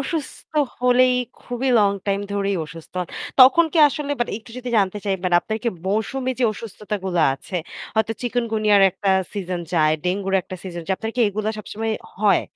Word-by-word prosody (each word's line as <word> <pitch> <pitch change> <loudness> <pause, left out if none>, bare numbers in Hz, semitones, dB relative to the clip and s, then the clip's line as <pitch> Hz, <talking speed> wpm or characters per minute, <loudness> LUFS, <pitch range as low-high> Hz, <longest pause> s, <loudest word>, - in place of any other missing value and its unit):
অসুস্থ 295 +2 -5 0.3
হলেই 250 0 +4 0.3
খুবই 245 +2 -2
লং 205 -1 +4 0.2
টাইম 200 0 +1
ধরেই 200 -1 0
অসুস্থ 165 +1 -12
হন। 175 - -9 0.3
তখন 265 +6 +8
কি 335 - +1
আসলে 290 0 -4
বাট 240 - 0
একটু 225 - -16
যদি 250 0 -6
জানতে 195 +1 +1
চাই 200 - 0 0.3
আপনার 220 +3 -3
কি - - +3 0.2
মৌসুমী 235 +6 -1
যে - - +4
অসুস্থতা 210 -1 -6
গুলো 180 -3 0
আছে, 180 +7 -7 0.4
হয়তো 220 0 +1
চিকুনগুনিয়ার 220 -4 +2
একটা 195 +2 -3 0.2
সিজন 185 -3 -3
যায়, 155 -2 +4
ডেঙ্গুর 195 +1 -1
একটা 185 - -8
সিজন 175 -3 -6
যায়। 190 - +1
আপনার 225 0 -4
কি - - +1
এগুলা 215 +2 -2
সবসময় 220 +1 -3 0.3
হয়? 205 -1 +4
210 Hz, 175 wpm, -22 LUFS, 195-245 Hz, 0.4 s, তখন